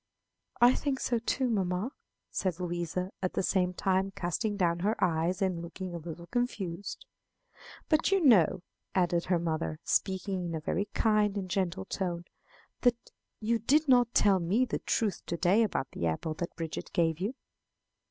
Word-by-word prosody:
"I 245 +1 +7
think 275 -2 -1
so 240 -2 0
too, 255 +3 0
mamma," 195 +1 0 0.4
said 185 -3 -1
Louisa, 175 +1 -2
at 185 - -1
the - - 0
same 180 -1 +2
time 190 +1 +1
casting 200 +3 -1
down 170 -3 +1
her 210 +5 +1
eyes 175 +3 +1
and 180 -3 0
looking 175 +2 -6
a 170 - -4
little 170 +1 -8
confused. 200 - -3 0.8
"But 310 +4 +2
you 390 - +4
know," 220 - +5 0.3
added 175 -2 +2
her 180 -1 +2
mother, 160 -2 -2
speaking 190 -1 0
in 170 -1 -3
a - - -2
very 190 +6 -1
kind 210 -2 +2
and 190 -2 -3
gentle 190 0 -1
tone, 175 -3 -3 0.6
"that 240 -1 +1 0.3
you 230 +1 +1
did 295 +7 +3
not 245 -2 +4
tell 195 -2 +5
me 195 +9 +2
the 245 - -3
truth 210 -5 0
to 170 - -2
day 190 +6 +4
about 205 -11 -1
the 85 - -2
apple 80 - -2
that 170 +2 -5
Bridget 165 -1 -5
gave 165 -2 +1
you." 210 +8 -2
185 Hz, 170 wpm, -30 LUFS, 170-220 Hz, 0.8 s, I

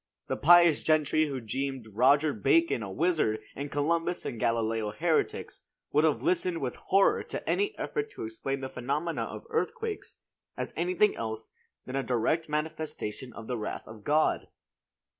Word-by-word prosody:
The - - +1
pious 170 -1 +6
gentry 155 0 +3
who 135 -2 -3
deemed 130 +2 -3
Roger 140 +6 +4
Bacon 135 +5 +3
a 105 - -5
wizard 150 - +1 0.2
and 140 +1 -4
Columbus 165 +4 0
and 115 - -4
Galileo 115 -1 0
heretics, 160 +9 -1 0.3
would 150 +2 +4
have 155 - +1
listened 180 -1 +1
with 130 -4 -3
horror 195 +1 +3
to - - -6
any 410 +1 0
effort 435 -1 -2
to 385 - -6
explain 330 - -3
the 130 - -3
phenomena 145 +7 -2
of - - -8
earthquakes 450 -2 -3 0.4
as - - -4
anything 185 +4 +2
else 110 -1 -5 0.3
than 130 - -5
a 135 - +1
direct 135 +6 0
manifestation 150 -6 -3
of 115 - -9
the 125 0 -3
wrath 105 - -5
of 110 -1 -11
God. 155 +1 +2
145 Hz, 160 wpm, -29 LUFS, 120-170 Hz, 0.4 s, pious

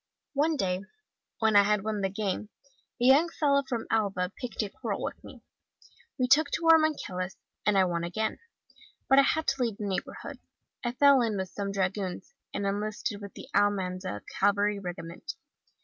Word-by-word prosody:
One 305 +3 +2
day, 185 -8 -1 0.6
when 220 -2 +2
I 205 - +9
had 205 0 +1
won 215 -1 -2
the 195 - +1
game, 200 +1 -3 0.5
a 240 - +1
young 285 +6 +6
fellow 285 -4 +2
from 245 -4 -4
Alava 195 -4 0
picked 240 -3 -3
a 205 - -4
quarrel - - -4
with - - -5
me. - - -13 0.7
We 255 -2 +1
took 285 +3 +5
to 330 - 0
our 325 - +7
maquilas,* 190 -12 -2 0.3
and 210 -1 +4
I 190 - +5
won 170 -1 -1
again. 215 +6 -2 0.7
But 270 - +6
I 275 - +5
had 315 0 -2
to 275 -1 0
leave 230 -4 0
the 210 - -4
neighbourhood. 195 -2 -4 0.4
I 240 -1 -1
fell 280 0 +6
in 220 -3 0
with 190 -1 -3
some 200 0 -4
dragoons, 190 -1 -2 0.2
and 200 - -3
enlisted 205 +1 -2
in 200 - -7
the - - -9
Almanza 185 - 0 0.2
Cavalry 205 +1 +2
Regiment. 180 - -7
205 Hz, 180 wpm, -29 LUFS, 190-255 Hz, 0.7 s, I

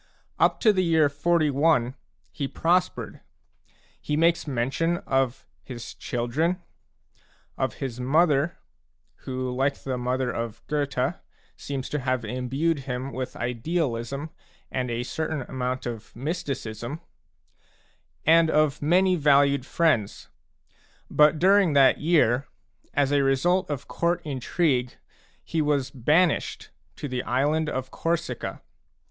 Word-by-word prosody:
Up - - +3
to 215 -3 +5
the 185 -1 +1
year 160 -4 +4
41 145 -4 +2 0.4
he 140 - -3
prospered. 175 +5 0 0.8
He 150 - -1
makes 165 0 +2
mention 140 +7 0
of 135 -1 0 0.2
his 120 -3 -8
children, 145 +9 -1 1.0
of - - -2
his 125 -3 -5
mother 150 +4 +2 0.7
who, 130 -1 -3
like 135 +2 +1
the 130 -2 -3
mother 125 +1 -1
of 115 -1 -5
Goethe, 140 -1 -1 0.4
seems 135 -2 -5
to 150 - -2
have 130 -3 -1
imbued 130 +7 -1
him 125 +2 -3
with 130 0 -5
idealism 135 +2 -2 0.4
and 125 -1 -2
a 120 +1 -2
certain 155 +1 -3
amount 130 0 -3
of 115 -3 -7
mysticism, 135 - -4 1.3
and 165 +1 +5
of 155 -2 +2
many 180 +5 +3
valued 140 -3 +3
friends. 140 -12 0 0.8
But 150 +1 +5
during 190 -1 +4
that 140 -2 +5
year, 145 -5 +2 0.5
as 140 -1 +2
a 145 -1 +3
result 175 +8 +2
of 145 -2 -4
court 170 +1 0
intrigue, 130 -2 0 0.5
he 160 - -1
was 145 -3 0
banished 150 +7 +1 0.2
to 145 - -5
the 125 -2 -2
island 145 +6 +1
of 130 0 -4
Corsica. 165 -7 -3
140 Hz, 120 wpm, -25 LUFS, 125-160 Hz, 1.3 s, to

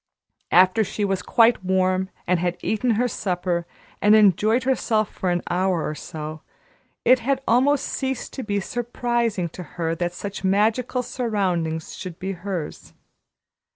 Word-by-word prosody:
After 185 +5 +5
she 205 +1 -2
was 195 -2 -1
quite 230 +1 +3
warm 185 0 +1 0.2
and 180 -1 +2
had 175 0 -1
eaten 225 +1 +1
her 245 +3 +2
supper 180 -5 -2 0.3
and 210 +1 +6
enjoyed 215 +4 +4
herself 230 -5 +1
for 185 - -2
an 175 0 0
hour 180 -2 0
or - - -3
so, 155 +1 -7 0.6
it 255 +2 +6
had 265 +3 -1
almost 275 +5 +3
ceased 265 -2 -3
to 265 - -4
be 205 -1 -1
surprising 235 -3 -1
to 180 - -9 0.2
her 165 -1 0
that 175 +1 -2
such 200 +2 -6
magical 220 +6 +1
surroundings 185 -11 -2
should 180 -4 -7
be 190 +1 -4
hers. 180 -3 -6
195 Hz, 150 wpm, -23 LUFS, 180-235 Hz, 0.6 s, and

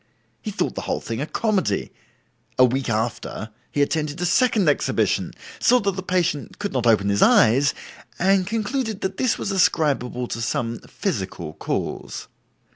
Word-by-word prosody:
He - - -4
thought - - -1
the - - -4
whole - - 0
thing 115 +2 -4
a 150 - -2
comedy; 210 -2 0 0.7
a 130 - +7
week 130 +1 -1
after, 110 0 -2 0.2
he 145 - +2
attended 155 +1 -2
a 180 - 0
second 215 0 +3
exhibition, 145 - +1 0.3
saw 250 - +5
that 200 -1 +1
the 190 - -3
patient 180 -5 -1
could 205 -1 -4
not 125 -2 0
open 105 -3 +4
his 100 0 +1
eyes, 135 +6 +5 0.4
and 190 0 +3
concluded 225 0 -2
that 190 0 -3
this 255 -3 +1
was 200 - -3
ascribable 140 -9 +1
to 115 - -4
some 115 0 -2
physical 85 -4 -4
cause. - - -4
150 Hz, 160 wpm, -23 LUFS, 120-195 Hz, 0.7 s, a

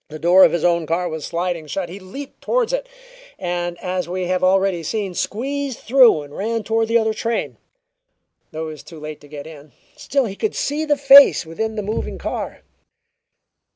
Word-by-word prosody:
The 155 - -7
door 175 +4 +6
of - - +6
his 170 - -1
own 170 -2 +2
car 175 +3 0
was 160 -3 -5
sliding 170 -2 -3
shut; 180 +5 -3
he 180 +4 -9
leaped 265 +10 -10
toward - - 0
it, - - -2 0.5
and, 175 -1 -3
as 180 -2 -3
we 185 0 -2
have 185 +1 -1
already 190 -1 +2
seen, 195 +3 -3
squeezed 270 +7 -3
through 240 - +5
and 145 0 -13
ran 225 +2 -2
toward 225 +1 0
the 230 +1 +3
other 220 -1 +1
train. 230 +1 -3 0.9
Though 160 +1 -5
he - - -6
was 155 - -10
too 165 -3 -12
late 155 0 -8
to 145 - -15
get 145 -1 -9
in, 150 -3 -13 0.2
still 280 -2 0
he 195 -3 -5
could 435 - -2
see 300 +2 -1
the 295 -1 +1
face 275 -6 +7
within 220 +7 -4
the 210 - -3
moving 215 +3 -3
car. - - -5
185 Hz, 195 wpm, -20 LUFS, 170-230 Hz, 0.9 s, face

